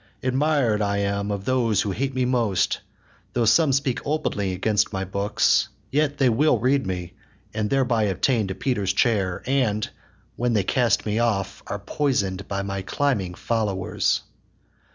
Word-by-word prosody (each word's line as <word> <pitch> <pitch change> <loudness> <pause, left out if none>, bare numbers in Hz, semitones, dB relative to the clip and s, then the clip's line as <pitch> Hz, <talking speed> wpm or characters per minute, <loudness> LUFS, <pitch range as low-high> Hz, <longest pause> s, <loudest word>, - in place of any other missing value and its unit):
Admir'd 130 -4 +2
I 100 -1 0
am 100 0 -1
of 100 -1 -3
those 120 -6 +2
that 100 - -2
hate 135 +5 -2
me 130 -1 +1
most: 115 -7 +1 0.5
Though 120 -2 +1
some 140 +7 +4
speak 135 -2 0
openly 105 -10 -1
against 100 +3 +1
my 95 0 -3
books, 100 +2 +1 0.2
Yet 145 +1 +1
will 130 +1 +3
they 115 - -8
read 135 -3 +2
me, 90 -1 -4 0.4
and 105 -1 -1
thereby 125 -5 +2
attain 105 +3 +1
To 95 - -4
Peter's 100 -6 -1
chair; 100 -5 +1
and, 125 -6 +1 0.5
when 120 0 0
they 105 -3 +2
cast 120 +4 +1
me 105 +1 0
off, 100 -5 -1
Are - - -3
poison'd 100 -3 -1
by 100 0 -2
my 100 0 -3
climbing 100 -5 -1
followers. 100 -6 -1
110 Hz, 155 wpm, -24 LUFS, 100-130 Hz, 0.5 s, some